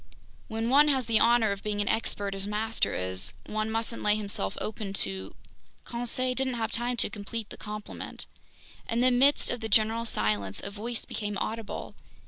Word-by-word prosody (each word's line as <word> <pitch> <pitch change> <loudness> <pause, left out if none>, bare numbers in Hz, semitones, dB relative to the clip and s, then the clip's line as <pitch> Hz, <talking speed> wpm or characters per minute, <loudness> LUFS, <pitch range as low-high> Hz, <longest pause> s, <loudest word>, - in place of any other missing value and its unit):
"When 225 0 -2
one 290 +2 +7
has 265 -4 +2
the 225 -1 +3
honor 230 -2 +5
of 200 0 -3
being 210 -1 -2
an 205 - +1
expert 205 -3 0
as 195 0 -3
master 220 +2 0
is, 95 +1 -1
one 215 0 -2
mustn't 225 +1 -1
lay 210 0 +4
himself 200 - -2
open 210 -2 -4
to—" 95 - -1 0.5
Conseil 245 +2 0
didn't 260 -1 0
have 225 -1 -2
time 240 +1 0
to - - +4
complete 215 +1 -5
the - - -7
compliment. 210 0 -6 0.6
In 230 +1 +1
the 255 0 +5
midst 270 +4 +4
of 245 - -2
the 220 -1 -4
general 225 +2 +4
silence, 105 - 0
a 200 - -5
voice 225 +3 -4
became 205 -2 -3
audible. 220 +2 -4
220 Hz, 180 wpm, -29 LUFS, 205-235 Hz, 0.6 s, one